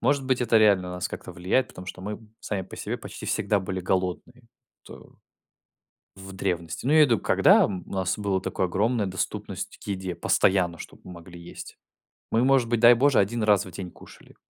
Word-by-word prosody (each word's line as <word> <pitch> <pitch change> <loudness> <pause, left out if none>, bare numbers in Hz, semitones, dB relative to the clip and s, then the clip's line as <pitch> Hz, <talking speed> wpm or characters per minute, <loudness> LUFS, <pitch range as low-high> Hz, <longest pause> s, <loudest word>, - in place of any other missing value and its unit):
может 140 -2 +1
быть, 130 -1 +1
это 115 -2 +2
реально 100 -4 +4
на 90 - -6
нас 90 +4 -3
как-то 90 - -8
влияет, 90 +9 0
потому 90 0 -11
что 90 - -8
мы 105 +2 -5 0.2
сами 100 -3 -3
по 90 - -11
себе - - -4
почти - - -9
всегда 105 -2 0
были 95 0 -4
голодные, 95 +7 -3 0.4
то - - -14 1.0
в 95 0 -10
древности. 85 -1 -3
Ну, - - +2
я 155 - +5
имею 150 - +7
в - - -3
виду, 115 - +3
когда, - - +5
м, 95 -3 -5
у - - -12
нас 95 0 -1
было 100 -2 -1
такое 95 - -2
огромная 105 +4 0
доступность 95 -1 -5
к - - -15
еде 95 -2 -4
постоянно, 90 0 +1
чтобы - - -11
мы 90 - -10
могли 85 0 -12
есть. 85 - -11 0.5
Мы, 115 +2 +2
может 130 -3 +3
быть, 120 -2 +1
дай 120 +1 +9
боже, 135 +3 +3
1 110 +4 0
раз 105 -2 +3
в 95 - -10
день 90 +1 -7
кушали. - - -17
95 Hz, 210 wpm, -25 LUFS, 90-115 Hz, 1.0 s, дай